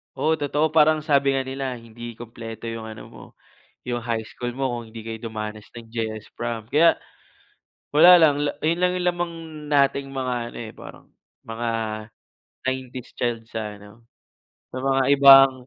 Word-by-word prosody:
Oo 155 - +1
totoo, 145 +2 +1
parang 155 0 +4
sabi 140 -3 +3
nga 135 - +1
nila 130 -1 -4
hindi 115 0 -9
kumpleto 115 -1 -8
yung 115 -1 -6
ano 110 0 -9
mo, - - -12 0.6
yung 120 -2 -2
high 115 -2 -2
school 120 0 -5
mo 135 +2 -2
kung 120 -2 -5
hindi 115 - -8
kayo 115 0 -4 0.2
dumanas 110 -1 -5
ng 115 -1 -11
JS 110 -2 -5
prom 115 -2 -4
kaya, 160 +6 +4 1.0
wala 175 +3 +9
lang 155 -3 +5
la 145 - 0
ayun 165 +2 0
lang 180 - +4
lamang 175 -1 -1 0.4
nating 140 -1 +2
mga 130 -2 -2 0.2
ano, - - -11
eh, 110 -2 -7
parang - - -12 0.4
mga 115 +1 -4 1.0
'90s 130 -1 -5
child 115 -2 -2
sa 105 -3 -6
ano, 105 +3 -16 0.7
sa 130 - -5
mga 135 0 +2 0.2
ibang, 135 -1 +9
125 Hz, 160 wpm, -23 LUFS, 115-140 Hz, 1.0 s, wala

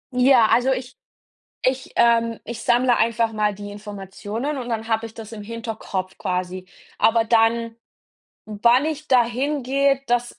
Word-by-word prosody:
Ja, 250 -2 +5
also, 255 +2 +3
ich 255 0 -4 0.7
ich, 260 0 -1
ähm 230 -1 +3
ich 230 0 -7
sammle 245 0 +3
einfach 230 0 +1
mal 210 -1 0
die 205 0 -8
Informationen 205 +6 -6
und 245 - -5
dann 225 -1 -3
habe 225 0 0
ich 225 - -10
das 225 -2 -10
im 220 -2 -8
Hinterkopf 215 -4 -5
quasi. 185 0 -3 0.3
Aber 225 +1 +3
dann, 230 0 +2 0.7
wann 235 +6 +3
ich 310 -1 -4
da 250 -2 +5
hingehe, 275 +2 0
das 240 0 -1
230 Hz, 150 wpm, -22 LUFS, 215-250 Hz, 0.7 s, Ja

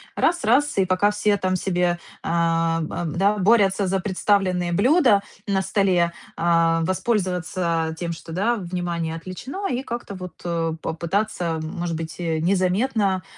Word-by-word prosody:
раз-раз, 290 -5 +2
и 190 - +4
пока 185 +3 +2
все 210 0 +1
там 185 0 0
себе, 180 -1 0 0.2
а, 165 -1 +1 0.2
да, 195 +7 +1
борются 200 -1 +3
за 190 +1 +1
представленные 185 -2 +1
блюда 245 - +4 0.2
на 195 -1 +1
столе, 190 -3 +2 0.3
а, 165 -1 +3
воспользоваться 180 -4 -1
тем, 170 -1 -2
что, 165 0 -8
да, 220 +8 +1
внимание 175 -3 -3
отвлечено, 255 - -5
и 250 +1 -1
как-то 235 -5 -6
вот 180 -3 -9 0.4
попытаться, 170 -1 -2
может 170 0 -3
быть, 160 +1 -6
и 165 -2 -1
незаметно 190 +2 +1
185 Hz, 130 wpm, -23 LUFS, 170-205 Hz, 0.4 s, и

